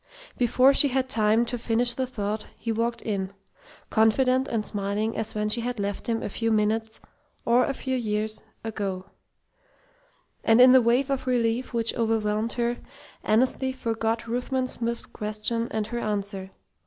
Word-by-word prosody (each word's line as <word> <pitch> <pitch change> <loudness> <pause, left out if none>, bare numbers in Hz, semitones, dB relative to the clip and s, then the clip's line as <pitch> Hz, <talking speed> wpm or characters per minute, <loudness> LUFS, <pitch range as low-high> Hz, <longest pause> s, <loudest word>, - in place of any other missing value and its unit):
Before 255 +3 +4
she 285 - +5
had 260 -1 0
time 220 -1 +3
to 245 0 -4
finish 235 +1 0
the 260 +1 -2
thought, 215 -3 -3
he 230 - -2
walked 230 +1 -1
in, 195 -3 -3 0.6
confident 255 +4 +3
and 220 -5 -2
smiling 205 +2 -2
as 220 0 -4
when 210 0 0
she 225 +3 +1
had 245 -1 -3
left 200 0 -3
him 230 -1 -1
a - - -2
few 225 +3 -1
minutes 220 +1 0 0.5
or 240 +2 +4
a 275 - -2
few 260 0 -2
years 215 -2 -2 0.2
ago; 200 -4 -4 1.4
and 225 +1 +5
in 250 0 +9
the 260 0 +7
wave 245 +4 +2
of 265 -1 -2
relief 240 0 0
which 230 -2 +1
overwhelmed 220 -1 0
her, 240 0 -1 0.5
Annesley 255 +4 +2
forgot 230 -2 -2
Ruthven 250 +2 -1
Smith's 235 -2 -1
question 215 +2 -3
and 220 -1 -2
her 240 +2 -4
answer. 200 -3 -3
230 Hz, 160 wpm, -26 LUFS, 215-245 Hz, 1.4 s, in